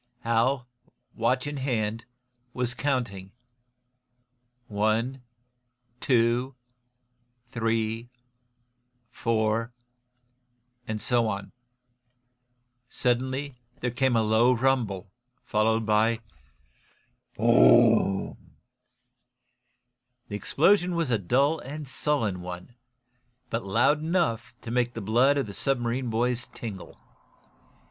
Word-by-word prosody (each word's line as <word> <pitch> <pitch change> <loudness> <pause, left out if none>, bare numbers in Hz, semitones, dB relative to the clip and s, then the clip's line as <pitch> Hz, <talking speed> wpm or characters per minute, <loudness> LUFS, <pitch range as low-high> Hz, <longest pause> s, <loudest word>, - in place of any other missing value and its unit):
Hal, 120 +3 +1 0.5
watch 125 +3 0
in 145 0 -4
hand 115 -4 -2 0.5
was 125 -1 -1
counting: 120 -9 -2 1.3
"One, 110 +5 0 0.8
two, 120 +1 +1 1.0
three, 115 0 -1 1.0
four 115 +1 0 0.6
" 125 0 -41
and 110 -1 -3
so 120 0 +2
on. 100 -2 -4 1.4
Suddenly 130 +2 -1 0.2
there 125 - -1
came 125 +1 +1
a 115 - +3
low 110 +3 +4
rumble, 115 -7 0 0.3
followed 110 +1 +1
by 110 +2 +2 1.2
Boo 110 - -6 0.9
oom! - - -23 1.7
The 105 - -4
explosion 175 - +2
was 165 -6 0
a 115 - +2
dull 140 - +2
and 145 +2 -7
sullen 125 -8 -1
one, 90 +5 -8 0.8
but 115 +1 -1
loud 120 +10 +2
enough 155 -9 -1
to 115 - -6
make 120 0 0
the - - -3
blood 120 +8 +3
of 140 - 0
the 100 - -8
submarine 125 0 -1
boys 120 +2 0
tingle. 105 -5 -8
120 Hz, 95 wpm, -27 LUFS, 110-130 Hz, 1.7 s, low